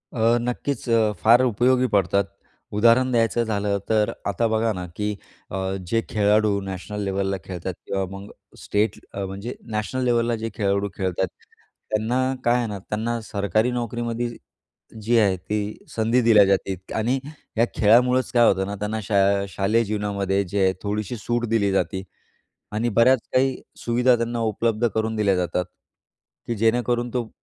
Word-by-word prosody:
अ, 115 +1 +3
नक्कीच 125 +2 -3 0.4
फार 115 +3 +6
उपयोगी 125 +2 +3
पडतात. 100 0 +2 0.5
उदाहरण 120 +4 +4
द्यायचं 115 -1 +2
झालं 100 -2 -1
तर 110 -1 +2
आता 110 +3 +1
बघा 110 0 +1
ना 90 -2 -5
की 105 - -2 0.4
अ, - - -4 0.3
जे 115 +4 +1
खेळाडू 105 -1 +2
नॅशनल 95 +2 -5
लेवलला 95 0 -1
खेळतात 90 0 -5
किंवा 95 -1 -1
मग 100 +1 -8 0.3
स्टेट 105 0 -1
अ, 100 0 -3
म्हणजे 100 +5 -6 0.2
नॅशनल 130 +5 -2
लेवलला 120 -1 +2
जे 115 0 -4
खेळाडू 100 -1 0
खेळतात, 95 -1 -1 0.6
त्यांना 110 +4 0 0.2
काय 120 +1 +3
आहे 120 -2 -1
ना, 105 -2 -4
त्यांना 110 +4 -3
सरकारी 105 +3 0
नोकरीमध्ये 120 0 -2 0.7
जी 115 +3 +2
आहे 100 -4 +3
ती 105 +3 -3 0.2
संधी 115 +3 +2
दिल्या 110 -3 +6
जाते 95 0 +1 0.2
आणि 120 +5 +1 0.4
या 115 - +5
खेळामुळंच 125 +4 +4
काय 120 -1 +5
होतं 95 0 +2
ना 100 - -4
त्यांना 105 +1 -2
शा 100 0 0 0.3
शालेय 105 +5 +1
जीवनामध्ये 100 -2 -1
जे 100 +2 0
आहे 95 0 +3
थोडीशी 105 +2 -2
सूट 120 +2 -1
दिली 100 -3 +2
जाते 95 0 -1 0.7
आणि 110 +3 0
बऱ्याच 130 +2 +6
काही 130 +1 +2 0.2
सुविधा 120 +1 +4
त्यांना 115 0 -2
उपलब्ध 115 +2 +1
करून 110 0 0
दिल्या 100 -3 +2
जातात 90 0 -1 0.8
की 120 - -1
जेणेकरून 120 +2 +1
तो 120 -3 -2
110 Hz, 155 wpm, -23 LUFS, 100-120 Hz, 0.8 s, फार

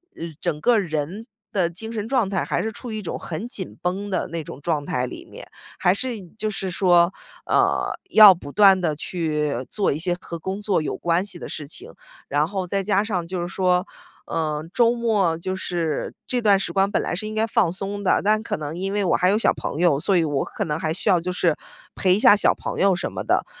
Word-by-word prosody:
呃 170 - -6 0.2
整 155 -4 -2
个 240 -2 +4
人 170 +5 -3 0.3
的 180 -4 +1
精 220 +6 -6
神 215 0 -3
状 245 -7 +1
态 190 -3 -1
还 - - -1
是 220 - -2
处 235 0 -8
于 215 - -4
一 - - -4
种 180 - -4
很 175 +8 -5
紧 190 -6 -5
绷 195 +3 -2
的 185 - -1
那 165 -1 -5
种 145 - -10
状 150 -3 -1
态 125 0 -1
里 - - -9
面， - - -11 0.4
还 180 - +4
是 250 +4 -1 0.2
就 215 -1 -1
是 195 -1 -3
说， 175 -1 +4 0.3
呃， - - +2 0.2
要 210 -6 +10
不 145 -4 -10
断 195 -1 +6
地 160 -4 0
去 150 -3 -2 0.2
做 205 -2 0
一 140 - -2
些 175 +2 +3
和 170 - -6
工 190 +5 -4
作 200 -6 +1
有 - - -3
关 175 +3 +1
系 185 -4 -4
的 - - -7
事 145 -2 -5
情。 415 - -8 0.4
然 145 +2 +1
后 190 -2 -3
再 195 +2 -1
加 200 0 +2
上 180 -6 -2
就 180 -1 -3
是 175 - -3
说， 180 0 +1 0.4
呃， 155 -2 -2
周 235 -1 +4
末 210 -8 +1
就 185 +3 -4
是 170 -5 -3
这 245 -1 0
段 200 -3 +4
时 - - -3
光 195 0 +2
本 - - +1
来 - - -3
是 215 +4 -4
应 215 - -6
该 220 +1 +2
放 215 -7 +2
松 200 +2 -5
的， 190 - +3
但 215 +1 +3
可 - - -3
能 150 +1 -5
因 195 +1 -2
为 205 - +1
我 - - +3
还 180 - +3
有 205 - +3
小 - - +3
朋 - - -5
友， 165 -6 +3
所 185 +4 +1
以 170 - +3
我 145 -3 0
可 - - -4
能 150 0 -2
还 155 -1 -1
需 185 - -7
要 180 - +5
就 180 +1 -3
是 175 -3 +1 0.4
陪 185 -1 +3
一 - - 0
下 205 - +7
小 - - +3
朋 - - -5
友 195 -2 +4
什 - - -3
么 - - -5
的， - - +1
185 Hz, 260 characters per minute, -23 LUFS, 165-205 Hz, 0.4 s, 要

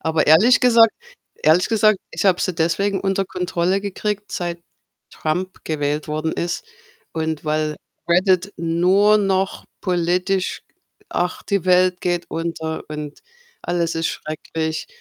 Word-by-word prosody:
Aber 160 -1 +1
ehrlich 185 +12 +6
gesagt 230 -3 +6 0.5
ehrlich 160 +4 +4
gesagt, 215 -3 +3
ich - - -2
habe 185 -2 +3
sie 185 - 0
deswegen 195 +5 +1
unter 195 0 0
Kontrolle 180 +1 -1
gekriegt, 205 +1 -3
seit 175 -1 -3 0.5
Trump 180 +4 -3
gewählt 150 -1 -2
worden 155 +1 -2
ist 175 - -3 0.5
und 160 -1 -3
weil 155 0 0 0.3
Reddit 185 +2 +3
nur 180 +6 +3
noch 195 -2 0 0.2
politisch 180 +1 0 0.5
ach, 180 +1 -2
die 200 -4 -1
Welt 180 0 +3
geht 175 -1 -1
unter 165 -1 -4
und 150 -1 -6 0.4
alles 170 -2 -1
ist 165 0 0
schrecklich 160 +1 -4
175 Hz, 130 wpm, -21 LUFS, 160-195 Hz, 0.5 s, ehrlich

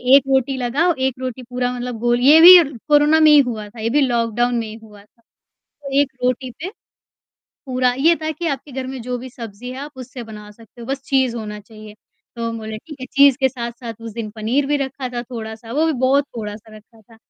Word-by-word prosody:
1 280 - +6
रोटी 265 0 +1
लगाओ, 280 +8 +1
1 265 -2 -1
रोटी 255 -1 -5
पूरा 245 +1 -2
मतलब, 245 -1 -5
गोल... 240 +1 +1
ये 290 +5 +7
भी 360 +2 +12 0.3
कोरोना 295 +2 +5
में 310 -1 +6
ही 295 - +8
हुआ 225 -6 -1
था, 230 - -14
ये 230 - -1
भी 290 +4 +2
लॉकडाउन 240 -1 0
में 225 - -4
ही 215 - -8
हुआ 210 -2 -15
था। 230 +3 -33 0.4
तो 275 -1 -2
1 285 -2 0
रोटी 255 +1 -1
पे 365 - -5 1.0
पूरा 255 -1 +1
ये 325 +5 +4
था 310 - -1
कि 315 +3 -5
आपके 280 0 -5
घर 260 0 -4
में 260 0 -6
जो 250 +1 -4
भी 255 +1 -9
सब्ज़ी 230 0 -9
है, 255 - -7
आप 290 +1 -7
उससे 255 -1 -8
बना 210 -2 -11
सकते 225 +2 -17
हो, 230 - -9
बस 270 +1 -3
चीज़ 260 -4 +1
होना 210 -2 -6
चाहिए। 215 0 -13 0.4
तो 230 0 -3
हम 230 0 -5
बोले, 220 0 -6
"ठीक 300 +5 -12
है।" - - -5
एक - - -15
चीज़ 280 -2 +6
के 265 - +4
साथ-साथ 235 -2 -7
उस 230 -1 -7
दिन 220 -1 -5
पनीर 240 +6 0
भी 290 +1 +1
रखा 265 -1 -6
था, 240 -1 -5
थोड़ा-सा, 225 -2 -8
वो 305 +5 +1
भी 320 - +1
बहुत 275 +2 +3
थोड़ा-सा 215 0 -8
रखा 220 +1 -19
था। 225 +2 -20
250 Hz, 235 wpm, -19 LUFS, 230-270 Hz, 1.0 s, भी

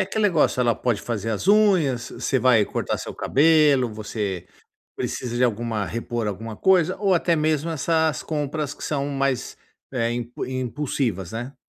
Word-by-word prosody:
aquele 210 +3 -1
negócio, 165 -8 +3
ela 120 -2 +3
pode 120 -4 -1
fazer 115 -1 -3
as 110 - -2
unhas, 180 - +3
você 130 - -1
vai 125 -4 +4
cortar - - -3
seu - - -7
cabelo, 145 -5 +3
você 105 -4 -4 0.5
precisa 120 -2 -4
de 125 - +2
alguma 115 -2 0
repor 115 +3 -3
alguma 110 +2 -5
coisa 185 - +3
ou 195 -2 +2
até 170 -1 +2
mesmo 155 0 0
essas 160 -1 +1
compras 150 -1 -3
que - - -11
são 140 -2 -1
mais, 135 -3 -1 0.4
eh, 115 -2 0
impu 120 0 -4
impulsivas 130 - -2
né. 120 +5 -5
130 Hz, 160 wpm, -23 LUFS, 115-155 Hz, 0.5 s, vai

